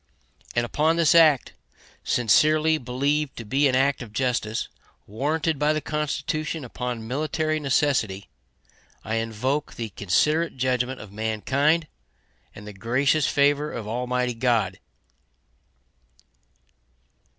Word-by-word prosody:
And 120 0 +2
upon 155 +6 +1
this 170 -1 +4
act, 155 -6 +5 0.5
sincerely 155 +7 +3
believed 140 +3 -1
to 115 - -7
be 140 +7 +2
an 130 - +1
act 140 +1 +2
of 120 -4 -9
justice, 120 -3 -1 0.4
warranted 150 +7 -1
by 150 +1 +2
the 155 - 0
Constitution 150 0 -3
upon 120 -2 -5
military 155 +4 -1
necessity, 135 -9 0 0.8
I 110 +2 -2
invoke 115 +6 -2
the 115 -2 -5
considerate 150 - 0
judgment 125 0 -1
of 110 - -11
mankind 130 +10 0 0.7
and 105 - -11
the 105 - -8
gracious 130 +8 +1
favor 145 +1 +2
of 110 -3 -6
Almighty 125 +2 -1
God. 115 -5 0
130 Hz, 115 wpm, -24 LUFS, 115-150 Hz, 0.8 s, act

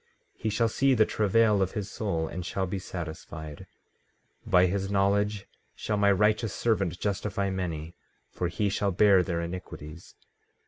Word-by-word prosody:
14:11 - - -27
He 110 - 0
shall 115 +2 +2
see 135 +4 +2
the 110 -2 +5
travail 105 0 +3
of 95 -1 0
his 105 -2 -3
soul, 95 -7 -2
and 90 +2 -5
shall 95 +2 -2
be 95 +2 -3
satisfied; 80 -4 -7 0.8
by 90 0 +5
his 95 +1 -1
knowledge 100 +1 +1 0.3
shall 105 - -2
my 100 0 +4
righteous 105 +2 +2
servant 95 -7 0
justify 100 0 -1
many; 85 -4 -4 0.4
for 90 - -2
he 100 +5 -1
shall 100 0 0
bear 95 0 +5
their 85 -2 -2
iniquities. 85 -2 -8
95 Hz, 155 wpm, -28 LUFS, 90-105 Hz, 0.8 s, the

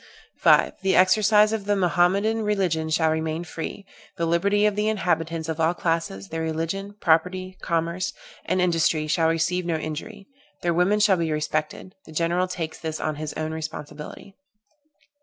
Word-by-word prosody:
"5. - - +3
The 190 -1 +2
exercise 210 +3 +5
of 215 -3 -3
the 205 0 +2
Mohammedan 195 +4 +2
religion 185 -7 0
shall 160 0 +2
remain 160 +1 -2
free; 175 +4 -6 0.3
the 170 - 0
liberty 200 +5 +2
of 210 -1 +2
the 210 +1 0
inhabitants 165 -5 -1
of 160 -1 -3
all 165 +2 +2
classes, 165 - -2
their 165 - -3
religion, 165 +6 -3
property, 185 +3 +1
commerce, 170 +2 -1 0.3
and 185 - 0
industry 165 -3 +2
shall 160 +1 +2
receive 165 +2 0
no 170 -1 -1
injury; 165 +7 -6 0.4
their 170 -1 +2
women 180 +5 +2
shall 205 -3 +4
be 165 -2 -1
respected: 155 +3 -3
the - - -11
general 170 +3 0
takes 165 -3 -5
this 160 -2 -4
on 155 -1 -2
his 155 -1 -5
own 155 0 -3
responsibility. 155 +3 -7
170 Hz, 160 wpm, -24 LUFS, 160-190 Hz, 0.4 s, exercise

